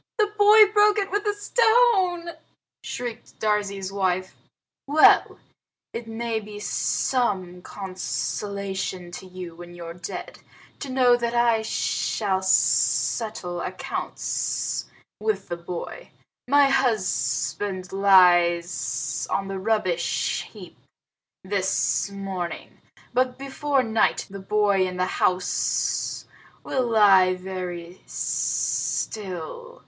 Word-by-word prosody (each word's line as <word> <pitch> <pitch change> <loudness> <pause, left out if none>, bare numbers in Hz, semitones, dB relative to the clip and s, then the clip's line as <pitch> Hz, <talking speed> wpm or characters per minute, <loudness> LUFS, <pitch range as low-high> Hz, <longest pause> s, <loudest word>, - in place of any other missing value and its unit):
"The 420 -1 +1
boy 425 +1 +8
broke 420 0 +5
it 395 -2 -1
with 410 +1 -1
a 415 - +2
stone!" 410 -6 +3 0.5
shrieked 240 -2 -6
Darzee's 200 -3 -1
wife. 185 -1 -1 0.5
"Well! 300 +2 +5 0.6
It 230 0 -6
may 225 0 -2
be 210 -1 -9
some 195 -5 -1
consolation 190 -1 -4
to 185 +1 -9
you 180 -2 -8
when 175 +1 -11
you're 170 -1 -8
dead 175 +1 -7 0.4
to 280 - -6
know 255 -2 +4
that 235 0 -2
I 235 -2 +3
shall 205 -2 -1
settle 190 -1 +1
accounts - - -3 0.3
with 210 -2 -2
the 175 - -2
boy. 175 - -7 0.4
My 285 +1 +5
husband 185 - 0
lies 175 -6 +3
on 195 0 -1
the 195 -1 -4
rubbish 185 -5 -1
heap - - -13 0.6
this 190 +1 0
morning, 195 -3 -6 0.3
but 250 0 +1
before 275 0 -1
night 225 -1 +1
the 195 - -7
boy 200 -1 +2
in 180 0 -6
the 180 - +1 0.2
house 180 0 0 0.4
will 255 -2 -1
lie 195 -5 +5
very 180 -1 -7
still. 215 - -2
200 Hz, 105 wpm, -24 LUFS, 185-250 Hz, 0.6 s, boy